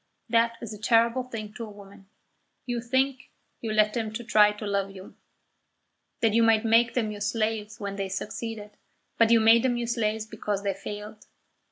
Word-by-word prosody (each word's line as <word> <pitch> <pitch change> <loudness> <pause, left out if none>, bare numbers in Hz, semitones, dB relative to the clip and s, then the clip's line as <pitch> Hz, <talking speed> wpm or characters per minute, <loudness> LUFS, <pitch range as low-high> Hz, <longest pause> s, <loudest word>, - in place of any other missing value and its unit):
That 230 0 +2
is 220 -2 -6
a 210 - -10
terrible 230 +2 +3
thing 225 -4 -7
to 230 - -7
a 220 - -7
woman. 200 -1 -14 0.6
You 240 -2 -2
think 260 +3 0 0.3
you 225 - -3
let 215 0 +3
them 225 -2 -2
try 215 -2 +3
to 210 +1 -8
love 200 -1 -1
you, 195 0 -12 1.1
that 225 -2 +3
you 230 - +4
might 225 -1 +4
make 230 +1 +4
them 225 -4 0
your 205 -1 -8
slaves 215 0 -2
when 200 -1 -5
they 195 -1 -3
succeeded; 210 +2 -5 0.5
but 230 -1 +5
you 230 -1 +6
made 225 +1 +6
them 245 -1 +1
your 240 - -2
slaves 220 -2 -1
because 210 -2 -4
they 200 -1 0
failed. 210 +2 -8
220 Hz, 185 wpm, -27 LUFS, 210-230 Hz, 1.1 s, you